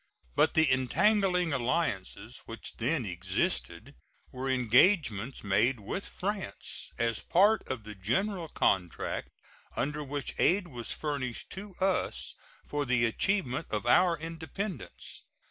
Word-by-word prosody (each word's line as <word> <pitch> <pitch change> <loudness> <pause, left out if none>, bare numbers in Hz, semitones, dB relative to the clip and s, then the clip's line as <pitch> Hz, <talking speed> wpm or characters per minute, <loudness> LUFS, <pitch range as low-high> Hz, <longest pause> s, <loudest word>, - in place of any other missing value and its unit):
But - - +4
the 160 -1 +6
entangling 180 - +3
alliances 120 - -1
which 115 -1 -6
then 125 +2 0
existed 90 -9 -1 0.4
were 130 +1 -3
engagements 130 - +3
made 115 +5 +2
with 110 - -4
France 200 +1 -4
as 115 -2 +1
a - - -12
part 205 +5 +5
of 125 -4 -4
the 105 0 -8
general 165 - -1
contract 90 - 0 0.5
under 150 +1 -1
which 140 -1 -4
aid 180 0 +3
was 120 -4 -5
furnished 140 -6 -3
to 190 0 -7
us 190 0 0 0.3
for 145 0 -1
the 125 -3 +2
achievement 145 - 0
of 105 +1 -2
our 175 +7 +5
independence. 165 +2 -6
135 Hz, 125 wpm, -30 LUFS, 115-180 Hz, 0.5 s, the